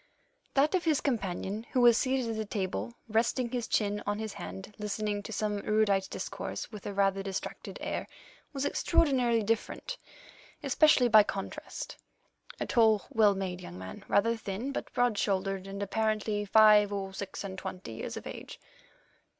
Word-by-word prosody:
That 285 +5 +4
of 370 -2 +2
his 310 -4 +3
companion 210 -3 -2
who 255 - +3
was 240 -1 +7
seated 260 -2 +1
at - - -3
the 220 - -1
table, 185 - -3 0.2
his 225 +1 +3 0.3
chin 205 -2 +1
resting - - -6
on 205 0 0
his 220 -1 -4
hand, 95 - -8
listening 210 0 -2
to 205 - -8
some 210 -1 -1
erudite 200 -2 +2
discourse - - -5
with 210 -3 -8
a 205 - -4
rather 195 0 +2
distracted 195 -1 -5
air, - - -3 0.4
was 275 -1 -2
extraordinarily 250 -10 +2
different, 230 - -2 0.6
especially 300 -5 +5
by 220 -2 +8
contrast. 195 -1 -5 0.6
A - - -1
tall 220 -4 +3
well 210 -3 +4
made 185 -2 -4
young 90 - -9
man, 95 0 -8
rather 230 +3 +3
thin, 225 +4 -4
but - - -5
broad 245 -4 +1
shouldered, 195 -1 -1
and 200 +1 -4
apparently 215 0 0
five 210 0 +6
or 195 -1 -3
six 195 0 -6
and 190 -1 -5
twenty 185 - -7
years 115 - -5
of - - -8
age. - - -8
210 Hz, 165 wpm, -30 LUFS, 195-230 Hz, 0.6 s, by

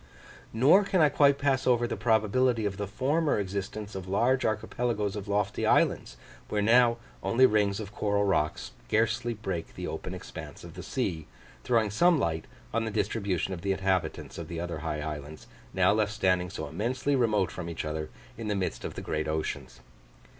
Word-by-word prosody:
Nor 140 - +5
can 190 -1 +1
I 155 -2 +6
quite 140 0 +4
pass 135 -2 +1
over 120 -1 +4
the - - -2
probability 110 +2 +2
of 100 -2 -2
the 100 -1 -3
former 145 - +1
existence 100 +2 -4
of 95 -1 -6
large 120 +7 +2
archipelagoes 110 -1 -1
of 105 -1 -6
lofty 100 0 0
islands, - - +2 0.3
where 105 - 0
now 120 +2 +5 0.2
only 130 +3 +4
rings 105 -3 +2
of 105 -2 -7
coral 100 -1 +1
rock 85 -6 +1
scarcely 115 - -1
break 95 -6 -5
the - - -5
open - - -5
expanse - - -9
of - - -10
the - - -8
sea, 80 -3 -3 0.4
throwing 110 -4 +2
some 175 +9 +4
light 80 - -1 0.3
on 115 - +1
the - - -2
distribution 100 -4 -1
of 85 - -6
the 100 +1 +1
inhabitants 95 -4 -1
of - - -6
the 85 - -5
other 85 -2 -4
high 75 -1 -3
islands, 75 0 -6 0.3
now 95 +2 +3
left 105 -1 +1
standing 90 -4 +1
so - - -5
immensely 130 +6 -1
remote 105 -7 +2
from 85 -2 -6
each 85 - -4
other 75 0 -3 0.3
in 115 - -4
the 105 - 0
midst 95 -2 -2
of - - -5
the - - -5
great 80 0 -2
oceans. 75 -5 -4
105 Hz, 185 wpm, -28 LUFS, 90-120 Hz, 0.4 s, I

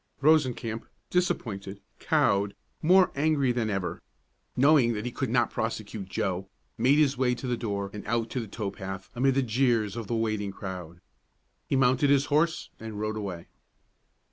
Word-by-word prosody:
Rosencamp, 130 -7 +2 0.2
disappointed, 100 - -1 0.2
cowed, 100 0 +2 0.3
more 185 +3 +5
angry 140 -3 +2
than 120 -2 -1
ever, 95 -3 -2 0.6
knowing 135 -3 +5
that 105 +1 -4
he 125 - -2
could 135 0 -2
not 120 0 +2
prosecute 110 -3 -4
Joe, 95 +1 -2 0.3
made 130 +5 +4
his 140 -4 +3
way 125 -2 +2
to 120 - -7
the 125 -1 0
door 100 -4 -3
and 105 - -6
out 115 +1 0
to 130 - -1
the 115 - -5
tow 100 -1 -4
path 95 0 -7
amid 130 +2 +2
the 135 - +3
jeers 115 -3 +1
of 115 -3 -5
the 115 - -1
waiting 110 -3 -1
crowd. 90 -3 -7 0.7
He - - 0
mounted 135 +1 +3
his 140 0 +4
horse, 160 +2 +1
and 110 -2 -6
rode 110 0 -2
away. 95 -5 -5
115 Hz, 170 wpm, -28 LUFS, 100-135 Hz, 0.7 s, more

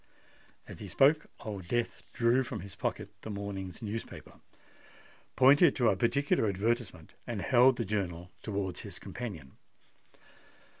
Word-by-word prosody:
As - - -9
he - - -7
spoke, 150 +3 +4
Old 100 -6 -6
Death 120 +4 -1
drew 120 +2 +3
from 120 -5 -5
his 100 +1 -10
pocket 100 0 -3
the - - -7
morning's 100 -2 -5
newspaper, 110 +1 -7 1.0
pointed 140 +4 +6
to 120 -3 +3
a 100 - +2
particular 120 +3 +2
advertisement, 100 -4 -2
and 120 -4 -3
held 125 +3 +5
the - - -1
journal 90 -3 -3
towards 100 -4 -3
his 100 -4 -9
companion. 95 - -7
105 Hz, 135 wpm, -31 LUFS, 95-120 Hz, 1.0 s, pointed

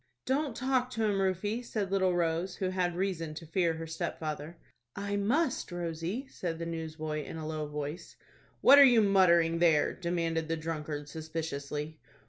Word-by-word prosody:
"Don't 270 -1 0
talk 255 -1 +1
to 225 -3 -2
him, 205 -2 +1
Rufie," 195 +5 0
said 210 -5 -3
little 190 -2 +2
Rose, 170 +2 0
who 185 - -1
had 180 -2 0
reason 175 -4 -2
to 165 - -8
fear 165 0 +1
her 165 0 -5
stepfather. 155 0 -4 0.4
"I 200 0 -2
must, 240 - 0
Rosie," 175 - -3
said 170 -10 -4
the 170 - -4
newsboy, 155 -2 -4
in 160 - -7
a 160 - -5
low 155 -1 -3
voice. 150 +3 -6 0.5
"What 280 - +9
are - - +11
you 245 -4 +7
muttering 170 -4 +4
there?" 165 -4 +4
demanded 165 -2 -1
the 165 0 -1
drunkard, 155 -2 -4
suspiciously. 155 -1 -5
170 Hz, 165 wpm, -31 LUFS, 160-195 Hz, 0.5 s, are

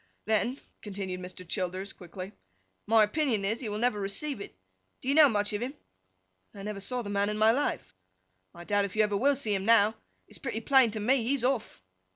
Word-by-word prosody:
'Then,' 220 +5 0 0.2
continued 195 -3 -5
Mr. 180 0 -9
Childers, 185 +1 -3
quickly, 185 +2 -9 0.6
'my 220 0 +6
opinion 225 -3 0
is, 220 +4 0
he 235 - -4
will 210 - -3
never 230 -2 +1
receive 200 +6 -2
it. 145 - -10 0.4
Do - - -10
you 275 - +3
know 305 -1 +7
much 205 -2 0
of 205 - -2
him?' 260 +4 -4 0.8
'I 200 - -8
never 210 -1 -5
saw 245 +5 -3
the 205 - -5
man 200 0 +1
in 210 - -2
my 215 +1 +5
life.' 280 +5 -2 0.6
'I 170 - -10
doubt 205 +2 +1
if 200 - -7
you 215 - +4
ever 210 -1 0
will 275 +7 +3
see 235 -6 +1
him 195 -1 -1
now. 220 -1 +5 0.3
It's - - -9
pretty 235 -5 -4
plain 265 0 +5
to 215 0 -5
me, 250 +5 +2
he's 260 +1 0
off. 250 - -1
210 Hz, 210 wpm, -29 LUFS, 200-245 Hz, 0.8 s, know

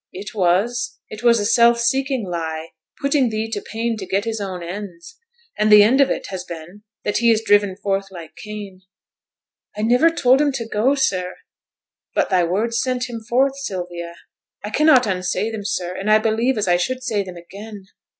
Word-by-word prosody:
'It 195 +3 -8
was. 225 +6 0
It 215 - -8
was 235 -1 +4
a 205 - -1
self 235 +1 +4
seeking 265 -1 0
lie; 160 -2 -4 0.3
putting 280 -3 +2
thee 220 0 -2
to 205 -2 -3
pain 230 +1 -3
to 195 - -6
get 195 +3 0
his 225 -2 -3
own 185 -3 -5
ends. 185 - -8 0.4
And 215 0 +3
the 210 -1 +9
end 255 +6 +4
of 275 - +4
it - - -2
has 190 -2 -5
been 175 +3 -10 0.2
that 205 - 0
he 235 0 +3
is 225 -1 +3
driven 205 -3 +3
forth 195 0 -2
like 165 -4 -11
Cain.' 205 -3 -9 1.0
'I 210 - -2
niver 245 +9 +4
told 265 -4 +3
him 295 -1 +2
to 235 -4 -4
go, 230 +6 +1
sir.' 185 -9 -1 0.8
'But - - +1
thy 185 -2 +3
words 220 +7 0
sent 250 -1 -2
him 230 - -5
forth, 255 +5 +1
Sylvia.' 175 -7 -5 0.5
'I 210 - -5
cannot 280 0 +5
unsay 190 +3 -1
them, 220 -2 -5
sir; 180 -2 -3
and 195 +3 -3
I 215 - +7
believe 225 +3 0
as 210 - -1
I 175 0 +4
should 255 +9 -2
say 220 -5 0
them 185 -2 -9
again.' 200 +3 -11
210 Hz, 195 wpm, -20 LUFS, 185-235 Hz, 1.0 s, the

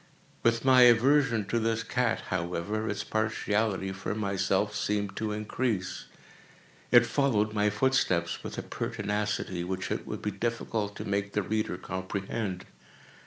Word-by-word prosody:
With 115 +1 +2
my 130 -1 +7
aversion 125 -1 +5
to 115 - +1
this 115 0 0
cat, 125 -3 0
however, 95 +5 -2
its 105 0 -2
partiality 110 -2 0
for 95 +2 -4
myself 100 0 0
seemed 100 -1 -1
to 110 -1 -1
increase. 105 -2 -2 0.8
It 120 -1 +7
followed 115 -4 +1
my 105 0 +2
footsteps 105 -7 +1
with - - -6
a - - -3
pertinacity 105 -3 -2
which 95 +1 -3
it - - -3
would - - -5
be 105 - -1
difficult 110 0 -2
to - - -6
make 100 0 -1
the 105 - +1
reader 110 -2 -1
comprehend. 95 +1 -4
105 Hz, 140 wpm, -29 LUFS, 100-115 Hz, 0.8 s, my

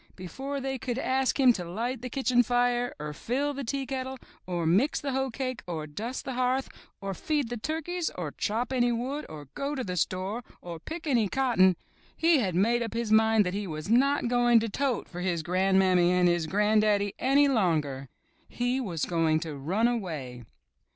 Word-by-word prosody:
Before 270 +10 -5
they 265 -1 -3
could 245 -1 -3
ask 265 +1 0
him 255 -2 +6
to 185 - -4
light 230 +8 -3
the 250 - -5
kitchen 255 -1 +2
fire, 245 +1 +1
or 150 0 -5
fill 270 - -2
the 280 0 -5
teakettle, 265 0 -3 0.3
or 175 -2 -2
mix 200 - +2
the 280 - -3
hoecake, 260 -1 -2
or 160 -3 -4
dust 220 - -5
the 265 - -3
hearth, 255 +2 0 0.3
or 195 -1 -3
feed 290 - -1
the 240 - -3
turkeys, 320 +7 -2
or 165 -5 -4
chop 235 - -2
any 245 -1 +2
wood, 260 +6 -3
or 150 -2 -9
go 285 +1 -3
to 260 - -2
the 180 -4 -4
store, 190 +7 -2 0.2
or 170 -2 -8
pick 320 - -7
any 235 -9 +2
cotton, 230 -9 +3 0.4
he 330 -2 +4
had 190 -7 -1
made 230 +6 +2
up 230 -1 -4
his 230 -2 -2
mind 220 -1 +5
that 180 - -2
he 205 0 -3
was 155 +1 -6
not 270 +3 +3
going 240 -1 +4
to 225 - -2
tote 265 +2 -1
for 180 0 -7
his 175 -3 -1
gran'mammy 185 0 +3
and 180 0 +3
his 175 -2 +1
gran'daddy 210 +1 +2
any 280 +2 +4
longer. 155 - 0 0.4
He 245 +2 -1
was 175 - -2
going 165 -2 +1
to 160 -3 -5
run 185 +12 +1
away 155 - -4
230 Hz, 190 wpm, -28 LUFS, 180-260 Hz, 0.4 s, him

